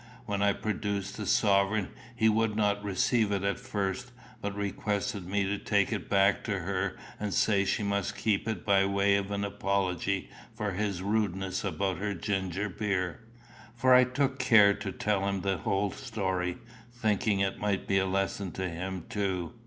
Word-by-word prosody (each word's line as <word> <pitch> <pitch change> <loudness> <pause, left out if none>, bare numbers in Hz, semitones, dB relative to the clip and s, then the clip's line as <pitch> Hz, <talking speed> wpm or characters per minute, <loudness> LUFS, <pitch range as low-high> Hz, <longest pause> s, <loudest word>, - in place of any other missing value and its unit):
When 100 -1 -2
I 100 0 +4
produced 100 -1 -3
the 105 -3 -4
sovereign 100 0 +3 0.3
he 110 -2 +3
would 110 0 +2
not 105 -1 +1
receive 105 +2 +1
it 100 -1 0
at 100 +3 0
first, 115 -1 -3 0.3
but 100 0 -3
requested 100 -1 -2
me 100 +1 +1
to 100 +1 -1
take 100 +1 +1
it 100 -6 -4
back 100 0 +3
to 100 -3 -1
her 95 +1 -2 0.2
and 105 -1 -2
say 100 0 +3
she 105 - 0
must 100 0 -1
keep 110 0 0
it 110 -6 -3
by 100 -1 +4
way 100 0 +3
of 100 0 -1
an 100 0 -2
apology 100 -1 -1 0.2
for 105 -1 -2
his 100 -1 -2
rudeness 95 -3 -1
about 95 -1 -1
her 100 0 -2
ginger 95 +1 -2
beer; 90 -3 -2 0.6
for 130 +2 +4
I 125 0 +8
took 135 +1 -1
care 110 -6 +6
to 100 - -5
tell 100 0 0
him 100 -1 -1
the 95 0 0
whole 95 +4 0
story, 95 -3 -2 0.3
thinking 110 -3 +1
it 95 -1 0
might 100 -2 -1
be 95 0 +3
a 95 - 0
lesson 95 0 -1
to 95 0 -2
him 90 +1 -5
too. 95 -2 -2
100 Hz, 175 wpm, -29 LUFS, 95-105 Hz, 0.6 s, I